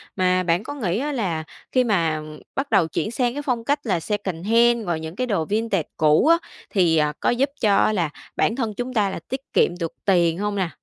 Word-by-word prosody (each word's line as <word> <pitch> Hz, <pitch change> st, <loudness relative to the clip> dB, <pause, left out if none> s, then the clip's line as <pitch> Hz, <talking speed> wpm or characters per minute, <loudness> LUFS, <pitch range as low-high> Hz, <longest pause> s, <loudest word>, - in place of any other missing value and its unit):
Mà 185 Hz, -1 st, +2 dB
bạn 175 Hz, +2 st, +1 dB
có 285 Hz, -, -6 dB
nghĩ 210 Hz, -8 st, -1 dB
á 295 Hz, +3 st, -2 dB
là 185 Hz, -, -2 dB, 0.3 s
khi 255 Hz, -, +3 dB
mà, 170 Hz, -9 st, +1 dB
ừm, 155 Hz, 0 st, -9 dB, 0.2 s
bắt 275 Hz, +1 st, -2 dB
đầu 195 Hz, -6 st, +4 dB
chuyển 215 Hz, -, -2 dB
sang 240 Hz, 0 st, 0 dB
cái 290 Hz, -, -4 dB
phong 250 Hz, -5 st, -1 dB
cách 285 Hz, +5 st, +1 dB
là 190 Hz, -7 st, 0 dB
secondhand 210 Hz, +5 st, +1 dB
rồi 170 Hz, -2 st, 0 dB
những 160 Hz, +1 st, -7 dB
cái 255 Hz, +4 st, -2 dB
đồ 195 Hz, -8 st, 0 dB
vintage 210 Hz, -3 st, -1 dB
cũ 155 Hz, -, +4 dB
á, 335 Hz, +1 st, +6 dB, 0.3 s
thì, 175 Hz, -5 st, +3 dB
à, 150 Hz, -1 st, +2 dB
có -, -, +1 dB
giúp 260 Hz, +4 st, +1 dB
cho 205 Hz, -3 st, +4 dB
á 215 Hz, -, +3 dB
là 175 Hz, -6 st, 0 dB, 0.3 s
bản 225 Hz, -, +1 dB
thân 230 Hz, -5 st, -2 dB
chúng 245 Hz, +4 st, -4 dB
ta 210 Hz, -4 st, +2 dB
là 190 Hz, -, -5 dB
tiết 265 Hz, +1 st, -3 dB
kiệm -, -, +4 dB
được 165 Hz, -2 st, -2 dB
tiền 170 Hz, -4 st, +3 dB
hông 205 Hz, +1 st, -2 dB
nè? 190 Hz, -4 st, 0 dB
205 Hz, 240 wpm, -23 LUFS, 170-240 Hz, 0.3 s, á